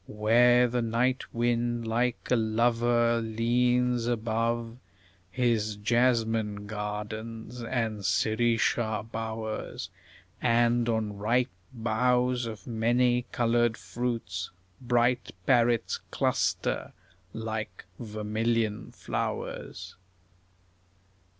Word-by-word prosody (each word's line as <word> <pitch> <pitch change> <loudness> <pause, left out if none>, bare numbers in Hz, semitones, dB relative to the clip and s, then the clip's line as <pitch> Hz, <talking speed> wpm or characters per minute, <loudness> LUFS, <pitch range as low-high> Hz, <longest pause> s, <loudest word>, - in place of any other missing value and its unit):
Where 120 +3 +4
the 120 0 -1
night 120 +3 0
wind, 120 0 0
like 120 +2 -1
a - - +6
lover, 115 +1 +2
leans 120 +2 +1
above 115 0 -1 0.5
His 110 -1 0
jasmine 110 -2 +1
gardens 110 +3 -5
and 115 -3 -2
sirisha 110 +2 +1
bowers; 110 -1 -4 0.5
And 120 0 +3
on 110 -3 -1
ripe 120 +5 +1 0.2
boughs 125 +1 +1
of 110 -5 -8
many 120 +2 +1
coloured 120 -1 +2
fruits 95 -2 -3 0.3
Bright 120 -1 +1
parrots 120 -2 +2
cluster - - 0 0.4
like 110 -4 -5
vermilion 110 0 -1
flowers. - - -4
115 Hz, 80 wpm, -28 LUFS, 110-120 Hz, 0.5 s, a